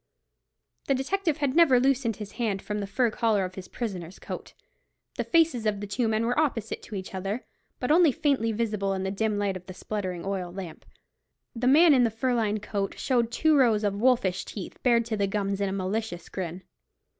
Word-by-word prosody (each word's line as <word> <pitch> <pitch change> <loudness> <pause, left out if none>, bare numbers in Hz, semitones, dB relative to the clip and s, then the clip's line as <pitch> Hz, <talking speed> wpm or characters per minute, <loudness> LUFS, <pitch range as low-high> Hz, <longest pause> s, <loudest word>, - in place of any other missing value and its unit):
The 275 - +3
detective 320 +4 0
had 285 -3 0
never 310 -7 +6
loosed 255 -3 +1
his 210 0 -8
hand 215 -5 -1
from 210 +2 -4
the 200 - -3
fur 240 +3 +1
collar 215 -4 +1
of 185 - -7
his 185 -1 -8
prisoner's 190 -7 -5
coat. - - -8 0.6
The - - 0
faces 320 -10 +2
of 205 -1 0
the 205 - -4
two 225 +4 -1
men 220 +1 +1
were 245 +5 +1
opposite 235 -8 -1
to 215 - -9
each 190 0 -6
other, 195 +5 -3 0.3
but 250 - -1
only 330 -1 +6
faintly 265 -5 +1
visible 210 -3 -1
in 190 0 -2
the 190 - -1
dim 215 +1 0
light 200 -2 0
of 185 0 -9
the 185 - -8
spluttering 185 -5 -4
oil 190 -3 -3
lamp. 180 -3 -8 0.7
The 240 +2 -1
man 310 +4 +7
in 255 -2 +5
the 235 - +3
fur 240 +4 -1
lined 215 -3 0
coat 200 -2 -3
showed 240 -3 +1
two 315 +5 +3
rows 230 -6 +4
of 205 -1 +1
wolfish 235 -8 +2
teeth, 200 - -8
bared 235 -2 +3
to 225 -2 -2
the 200 -1 +1
gums 200 0 -1
in 200 - +1
a - - -3
malicious 195 -1 -3
grin. 180 0 -5
215 Hz, 210 wpm, -27 LUFS, 195-250 Hz, 0.7 s, man